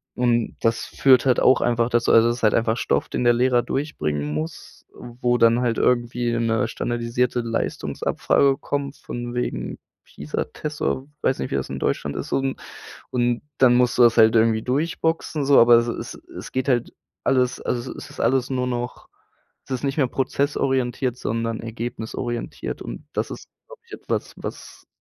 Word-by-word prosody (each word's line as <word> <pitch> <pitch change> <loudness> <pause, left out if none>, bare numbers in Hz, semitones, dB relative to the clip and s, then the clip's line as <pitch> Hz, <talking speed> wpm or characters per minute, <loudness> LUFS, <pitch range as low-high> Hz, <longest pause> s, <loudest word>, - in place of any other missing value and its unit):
und 120 -2 +1
das 115 0 +1
führt 130 -2 +4
halt 130 -2 +3
auch 130 - +5
einfach 120 0 +1
dazu 120 -1 +2
also, 115 0 +6
das 120 - -1
ist - - -12
halt 105 - +4
einfach 115 0 +1
Stoff, - - 0
den - - -2
der 120 - +5
Lehrer 125 0 +3
durchbringen 75 - -2
muss, 80 +2 -6
äh, - - -25 0.3
wo 120 0 +3
dann 115 +1 +4
halt 120 -2 0
irgendwie 120 -1 +1
'ne 115 -1 +1
standardisierte 120 +1 -1
Leistungsabfrage 135 +3 0
kommt 140 -1 -3
von 120 0 -6
wegen, 90 - -3 0.3
Pisa-Test 150 - -5
oder 130 +1 -1
weiß 130 - +1
nicht, 65 - -3
wie - - 0
das - - -2
in - - -5
Deutschland 75 - -1
ist - - -4
un 135 0 0 0.5
und 120 -1 +1 0.2
dann 125 -2 +6
musst 125 0 +2
du - - +4
das 120 0 +5
halt 110 0 +6
irgendwie 110 0 +3
durchboxen 155 +2 -1
so, 140 0 +6
aber 120 0 +7
es 115 0 +3
es 115 - -5 0.2
es - - -8
geht 130 +1 -2
halt 120 -3 +1 0.3
alles 125 -1 +1
also 120 +1 -3
es - - -9
ist - - -13
alles 130 0 +2
nur 125 -1 -1
noch 125 0 -4 0.6
es 135 - -7
ist 125 - -2
nicht 135 0 -1
mehr 140 -4 +3
prozessorientiert, 130 -2 0
sondern 115 -1 -2
ergebnisorientiert 115 +1 -5
und - - -8
das - - -2
ist, - - -9 0.2
glaube - - -14
ich, 420 - -18
etwas, - - -4
was - - -9
120 Hz, 180 wpm, -23 LUFS, 115-130 Hz, 0.6 s, aber